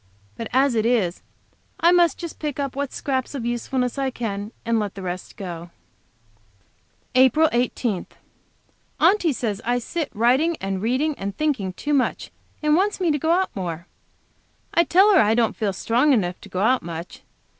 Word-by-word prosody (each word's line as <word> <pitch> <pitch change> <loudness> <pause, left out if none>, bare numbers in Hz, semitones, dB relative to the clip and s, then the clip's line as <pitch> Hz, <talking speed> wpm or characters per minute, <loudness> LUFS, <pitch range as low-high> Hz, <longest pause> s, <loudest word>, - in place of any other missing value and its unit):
But 230 - -5
as 265 +1 +3
it 220 -2 +1
is, 220 -7 +1 0.6
I 340 - +5
must 345 -4 +4
just 340 -2 -7
pick 295 -3 -4
up 275 -2 -3
what 280 -1 -2
scraps 265 0 -3
of 245 -4 -4
usefulness 250 +2 -2
I 270 -1 0
can, 210 -4 -4
and 230 0 +1
let 205 -3 -3
the 195 - -7
rest 180 0 -6
go. 175 -3 -7 1.4
APRIL 260 +5 +5
18. 235 -4 -1 0.9
Aunty 375 -5 +4
says 225 -5 -3
I 245 +1 +1
sit 305 +6 -3
writing 260 +9 +2
and 195 -1 -3
reading 260 +8 +1
and 195 0 -4
thinking 260 -12 -1
too 295 +9 -3
much, 270 -3 0 0.3
and 300 0 +4
wants 395 +4 +1
me 350 -4 +2
to 295 - 0
go 320 - -1
out 370 +3 +1
more. 170 -3 -4 0.9
I 340 - +4
tell 390 +5 +5
her - - +6
I 215 +1 +3
don't 230 -2 +1
feel 210 -3 -1
strong 240 +9 +2
enough 180 -7 0
to - - -12
go 185 - -3
out 250 +5 +3
much. 170 0 -7
245 Hz, 175 wpm, -23 LUFS, 205-295 Hz, 1.4 s, her